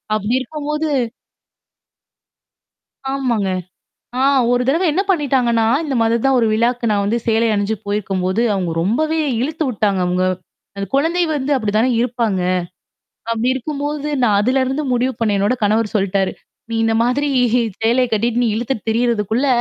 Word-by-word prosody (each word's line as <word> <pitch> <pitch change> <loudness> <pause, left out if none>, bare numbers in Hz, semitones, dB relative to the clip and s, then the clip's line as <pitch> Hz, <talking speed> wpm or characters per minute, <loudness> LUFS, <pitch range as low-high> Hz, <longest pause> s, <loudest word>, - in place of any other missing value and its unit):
அப்பிடி 215 +4 0
இருக்கும்போது 300 +2 -3 2.2
ஆமாங்க. 240 -7 0 0.7
ஆ - - +2 0.3
ஒரு 245 0 +2
தடவ 325 +7 +2
என்ன 370 - +2
பண்ணிட்டாங்கன்னா, 250 -8 +1 0.2
இந்தமாதிரி 235 -6 +1
தான் 270 -1 +4
ஒரு 230 - +2
விழாக்கு 235 +1 +1
நான் 200 -1 +1
வந்து 225 +4 +1
சேலை 225 +1 +2
அணிஞ்சு 205 +2 0
போயிருக்கும்போது 200 -2 -2 0.3
அவங்க 180 -3 -2
ரொம்பவே 310 - 0 0.2
இழுத்து 315 +4 -2
விட்டாங்க 205 -5 0
அவுங்க 180 +1 0 0.5
அந்த 200 - -2
குழந்தை 325 +6 +2
வந்து 280 +1 -2
அப்பிடி 215 -6 -1
தானே 230 +4 +3
இருப்பாங்க. 235 -5 0 0.9
அப்பிடி 230 +2 0
இருக்கும்போது 290 +2 -3
நான் 215 -4 +3
அதுலருந்து 260 +5 +1
முடிவு 250 +2 +1
பண்ணேன். 210 -3 +1
என்னோட 205 +5 +2
கணவர் 215 +1 +1
சொல்லிட்டாரு 195 -1 0 0.4
நீ - - -3
இந்த 225 - +1
மாதிரி 275 +4 0 0.5
சேலய 245 +3 +3
கட்டிட்டு 230 +2 0
நீ 240 - +2
இழுத்துட்டு 235 -1 -3
திரியிறதுக்குள்ள 230 +1 +1
235 Hz, 140 wpm, -18 LUFS, 210-270 Hz, 2.2 s, தான்